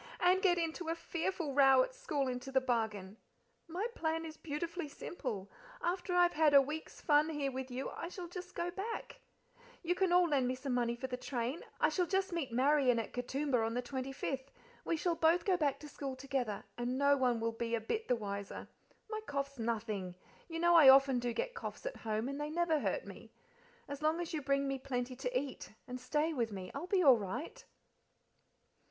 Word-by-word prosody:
And 365 +1 +4
get 360 -3 +4
into 330 0 -2
a 330 - 0
fearful 335 -2 -3
row 270 -2 +6
at - - -5
school 295 - -2
into 250 +1 -4
the 265 - +4
bargain. 220 -6 -2 0.5
My 355 +6 -2
plan 325 -2 -1
is 315 -1 -7
beautifully 330 +2 -4
simple. 245 - -5 0.3
After 360 -1 -1
I've 350 0 +5
had 300 -2 +4
a - - +11
week's 300 +4 -3
fun 300 +1 +4
here 290 -3 -1
with 260 0 -5
you 255 +2 -4
I 335 - -5
shall 360 -1 -7
just 360 +1 -8
go 345 +1 -2
back 405 +5 -5 0.6
you 345 +1 +2
can 370 0 +1
all 355 0 +5
lend 275 -5 +2
me 255 - 0
some 260 0 -3
money 240 -1 +1
for 245 - -5
the 255 -1 -3
train. 250 +3 -3 0.2
I - - +4
shall 360 -2 0
just 385 0 0
meet 315 -8 -2
Marian 260 0 +4
at 230 - -3
Katoomba 250 0 0
on 225 +1 -1
the 250 - -1
25th; 265 +1 -4 0.4
we 330 - 0
shall 345 +2 +1
both 335 +1 +3
go 380 - +4
back 295 -6 0
to 300 - -8
school 275 -2 -5
together, 255 -6 -2 0.2
and 245 +2 -1
no 280 +1 +5
one 250 -4 +2
will 230 0 0
be 230 +1 -2
a - - -1
bit 435 - -3
the 250 - +3
wiser. 200 -3 -5 0.4
My 435 0 -4
cough's 275 -1 -3
nothing; 215 -5 -2 0.3
you 330 - -4
know 345 +1 +4
I 315 -5 +9
often 270 -1 +7
do 240 0 -1
get - - -2
coughs 465 - -7
at - - -4
home, 220 +1 -2
and 280 +2 -4
they 295 - -2
never 325 -1 +1
hurt - - -1
me. - - -11 0.5
As 285 0 -6
long 310 +2 +2
as 345 -2 -4
you 310 - -1
bring 275 0 +1
me 275 -1 -2
plenty 255 -1 -3
to 250 0 0
eat, 275 -1 -7 0.2
and 250 0 -5
stay 300 +5 0
with 235 -6 -1
me, 185 -2 -6
I'll 285 +6 -5
be 370 -1 +3
all 260 -6 +7
right." 245 - -5
280 Hz, 210 wpm, -34 LUFS, 250-335 Hz, 0.6 s, a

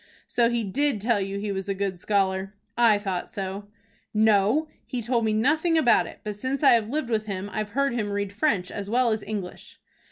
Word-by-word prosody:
"So 235 -1 +2
he 235 -1 0
did 270 +4 0
tell 220 0 +1
you 195 +1 -3
he 205 0 -3
was 195 0 -4
a 195 - 0
good 195 -2 -2
scholar? 195 0 0 0.2
I 230 -3 +5
thought 190 -3 -3
so." 195 0 -5 0.5
"No, 215 +7 +3 0.2
he 250 - -3
told 235 0 0
me 220 - +2
nothing 310 +10 +2
about 275 -7 +4
it; - - -12
but 210 -1 -4
since 260 +6 -3
I 275 - +8
have 225 -2 +2
lived 280 -3 -2
with 215 -1 0
him 200 0 -4
I've 215 -1 -2
heard 275 -2 +2
him 215 -4 -1
read 200 -1 -2
French 205 -7 0
as 200 0 -5
well 240 +1 +3
as 215 -1 -1
English." 200 -5 -7
215 Hz, 215 wpm, -25 LUFS, 200-240 Hz, 0.5 s, I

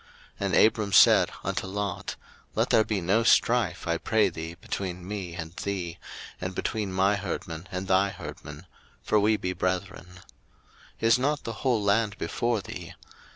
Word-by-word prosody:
01:013:008 - - 0
And - - +1
Abram 105 -2 +3
said - - +7
unto - - -2
Lot, 100 -1 -3 0.4
Let - - +1
there 110 - +5
be 105 -3 -2
no 100 +7 +2
strife, 115 -7 +2
I 85 0 0
pray 110 -3 +2
thee, 80 0 -7
between 90 0 -5
me 95 -4 -5
and 80 -1 -6
thee, 90 -4 -4 0.4
and 90 0 -4
between 105 -1 -2
my 95 +2 +2
herdmen 85 -3 -5
and 95 +1 -4
thy 95 +1 +3
herdmen; 75 -3 -9 0.4
for 105 - +3
we 105 +1 +3
be 90 -2 -3
brethren. 90 0 -2
01:013:009 90 0 -15 0.8
Is 115 +2 +4
not 145 +3 0
the 115 - -4
whole 120 -2 0
land 105 +1 +2
before 120 -3 -1
thee? - - -8
95 Hz, 165 wpm, -27 LUFS, 90-110 Hz, 0.8 s, said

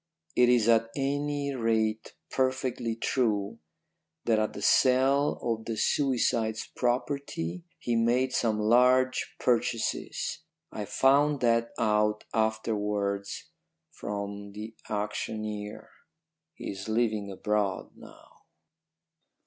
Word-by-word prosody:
It 125 0 +5
is 120 -3 +4
at 115 -1 +4
any 145 +1 -1
rate 110 -3 0 0.2
perfectly 130 -3 -1
true 110 -4 0 0.7
that 110 -2 +3
at 110 - -1
the 100 - -7
sale 135 +2 +4
of 115 -2 -2
the 115 - -3
suicide's 115 -4 +1
property 130 - -2
he 120 - -1
made 125 +3 +2
some 110 -4 +1
large 125 +4 +3
purchases. 120 -2 -1 0.3
I 105 - -4
found 140 +5 +3
that 115 -1 +2
out 105 -1 +1
afterwards 105 0 -1 0.4
from 100 -5 -6
the 110 +2 -7 0.2
auctioneer. 105 0 -4 0.6
He - - -5
is 95 +2 -7
living 110 -3 0
abroad 105 0 -1
now. - - -16
115 Hz, 100 wpm, -28 LUFS, 105-130 Hz, 0.7 s, It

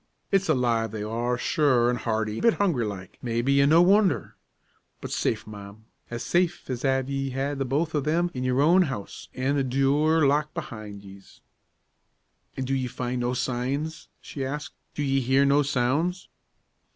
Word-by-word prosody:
It's 195 -2 +2
alive 120 -5 +1
they 105 0 -5
are, 120 +3 -1
sure; 130 -4 +2
an' 125 0 +1
hearty; 110 -2 -2
a - - -5
bit 230 - +4
hungry 170 - +1
like, 95 -3 -8
maybe, 125 +4 +1
an' 140 - +4
no 165 +3 +6
wondher; 195 +1 +3 0.7
but - - -7
safe, 110 - -1
ma'am, 105 0 -11 0.2
as 120 0 -5
safe 175 0 0
as 125 0 -4
av 135 -1 +1
ye 135 0 -2
had 135 +2 -3
the 135 - 0
both 150 +6 -1
o' 150 - +1
thim 170 +5 0
in 125 - -4
your 130 +1 +1
own 175 +5 +5
house, 130 - -4
an' 135 +3 0
the 135 - +1
dure 140 +4 +2
locked 150 +3 +1
behind 110 - -7
yez." 95 0 -15 1.2
"An' 130 - -2
do 135 - -2
ye 130 -1 0
find 125 0 -3
no 120 +1 -1
signs?" 135 +6 -3
she 140 - -6
asked. 145 +3 -5 0.2
"Do 150 - -2
ye 135 -1 +1
hear 130 +3 +3
no 140 +1 +4
sounds?" 145 +7 0
135 Hz, 180 wpm, -26 LUFS, 120-150 Hz, 1.2 s, no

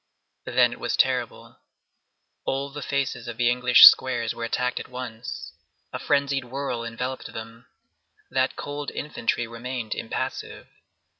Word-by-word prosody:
Then - - +3
it - - -11
was - - -2
terrible. - - 0 0.8
All 140 +1 -2
the 145 +1 -7
faces 135 -3 -2
of 120 -2 -6
the 120 0 +3
English 125 0 +8
squares 120 -3 +6
were 115 - -6
attacked 125 +2 -1
at - - -8
once. 125 -2 -7 0.4
A - - -3
frenzied 140 -2 +1
whirl 125 -2 -4
enveloped 125 +3 -5
them. 115 +1 -9 0.6
That 130 0 +1
cold 145 0 -5
infantry 120 -4 -2
remained 115 0 -5
impassive. 115 - -5
125 Hz, 135 wpm, -25 LUFS, 115-135 Hz, 0.8 s, English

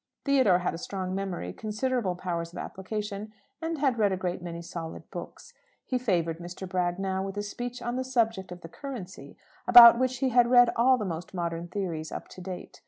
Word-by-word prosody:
Theodore 260 -10 +4
had 180 - -2
a 165 - -6
strong 185 0 -4
memory, 185 - -4
considerable 215 -2 -1
powers 170 -2 -4
of - - -9
application, 210 +2 -5 0.3
and 325 0 -2
had 265 -5 +1
read 205 -2 +3
a 190 - 0
great 180 -1 -3
many 170 -1 -6
solid 165 -1 -7
books. - - -9 0.3
He 255 - -1
favoured 170 -8 0
Mr. 175 +2 -7
Bragg 180 -1 -1
now 190 -1 -1
with 195 +1 -6
a 205 - -1
speech 245 +4 -6
on 240 +1 -2
the 260 - -1
subject 225 -7 0
of 180 0 -8
the 165 - -8
currency, 190 - -8 0.3
about 235 -1 +10
which 255 0 0
he 260 +1 +1
had 240 -1 +4
read 245 -1 +7
all 255 +2 +5
the 215 - -3
most 175 +1 -5
modern 170 -1 -3
theories 170 -4 -4
up - - -7
to 185 - -11
date. 180 -1 -8
195 Hz, 205 wpm, -28 LUFS, 175-240 Hz, 0.3 s, about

